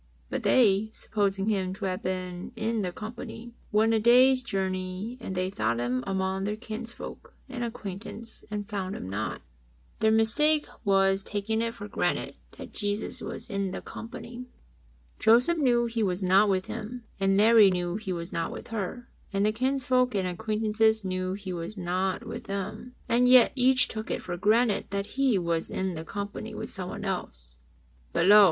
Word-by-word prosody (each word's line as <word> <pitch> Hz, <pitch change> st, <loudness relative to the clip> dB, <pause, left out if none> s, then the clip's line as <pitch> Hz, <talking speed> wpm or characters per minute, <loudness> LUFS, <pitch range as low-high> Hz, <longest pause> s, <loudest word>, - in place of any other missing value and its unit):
But -, -, -1 dB
they, 215 Hz, -3 st, +4 dB
supposing 200 Hz, -2 st, -1 dB
Him 190 Hz, -3 st, 0 dB
to -, -, -5 dB
have 185 Hz, +1 st, -2 dB
been 185 Hz, +2 st, -4 dB
in 225 Hz, 0 st, -1 dB
the 180 Hz, -2 st, -2 dB
company, 230 Hz, +3 st, -8 dB, 0.2 s
went 220 Hz, +2 st, +3 dB
a 220 Hz, -, +3 dB
day's 255 Hz, +3 st, +6 dB
journey; 190 Hz, 0 st, -3 dB
and 190 Hz, -, -5 dB
they 185 Hz, +1 st, 0 dB
sought 110 Hz, -, 0 dB
Him 125 Hz, +1 st, -1 dB
among 190 Hz, 0 st, -1 dB
their 210 Hz, +1 st, -1 dB
kinsfolk 230 Hz, +1 st, -8 dB
and 255 Hz, -2 st, -4 dB
acquaintance 225 Hz, 0 st, -7 dB
and 205 Hz, -1 st, -4 dB
found 195 Hz, -1 st, -3 dB
Him -, -, -6 dB
not." 95 Hz, -1 st, -4 dB, 0.6 s
Their 220 Hz, -, +4 dB
mistake 290 Hz, +8 st, +4 dB, 0.2 s
was 195 Hz, -1 st, +3 dB
in -, -, -14 dB
taking 215 Hz, +2 st, -1 dB
it 230 Hz, 0 st, -2 dB
for 205 Hz, -, -7 dB
granted -, -, -1 dB, 0.2 s
that -, -, -9 dB
Jesus 205 Hz, 0 st, -3 dB
was -, -, -6 dB
in 200 Hz, -3 st, -1 dB
the -, -, -5 dB
company. 240 Hz, +2 st, -8 dB, 0.7 s
Joseph 245 Hz, +10 st, +5 dB
knew 240 Hz, -4 st, +3 dB
He 230 Hz, -1 st, -2 dB
was 190 Hz, -2 st, 0 dB
not 195 Hz, +3 st, +5 dB
with 190 Hz, -1 st, +1 dB
him, 235 Hz, +2 st, -6 dB, 0.2 s
and 195 Hz, 0 st, +3 dB
Mary 215 Hz, -1 st, +7 dB
knew 180 Hz, 0 st, -1 dB
He 215 Hz, -3 st, -5 dB
was 170 Hz, 0 st, -5 dB
not 165 Hz, -1 st, -1 dB
with -, -, -8 dB
her, 225 Hz, +2 st, -4 dB, 0.2 s
and 200 Hz, 0 st, +1 dB
the 215 Hz, -, +3 dB
kinsfolks 255 Hz, 0 st, +1 dB
and 190 Hz, -2 st, +1 dB
acquaintances 220 Hz, +2 st, +1 dB
knew 185 Hz, 0 st, -2 dB
He 195 Hz, -2 st, -5 dB
was 175 Hz, +5 st, -5 dB
not 185 Hz, +1 st, -1 dB
with -, -, -7 dB
them, 210 Hz, +5 st, -5 dB
and 245 Hz, +2 st, +3 dB
yet 250 Hz, -1 st, +7 dB
each 255 Hz, -1 st, +4 dB
took 220 Hz, 0 st, -6 dB
it -, -, -2 dB
for 175 Hz, -, -4 dB
granted 215 Hz, +4 st, +2 dB
that 200 Hz, 0 st, -2 dB, 0.2 s
He 260 Hz, -7 st, +4 dB
was 170 Hz, -2 st, -1 dB
in 190 Hz, -1 st, -2 dB
the 160 Hz, -1 st, -5 dB
company 200 Hz, +2 st, -5 dB
with -, -, -5 dB
someone -, -, -5 dB
else. -, -, -4 dB, 0.5 s
But -, -, +1 dB
lo 205 Hz, +2 st, +9 dB
205 Hz, 180 wpm, -28 LUFS, 185-230 Hz, 0.7 s, lo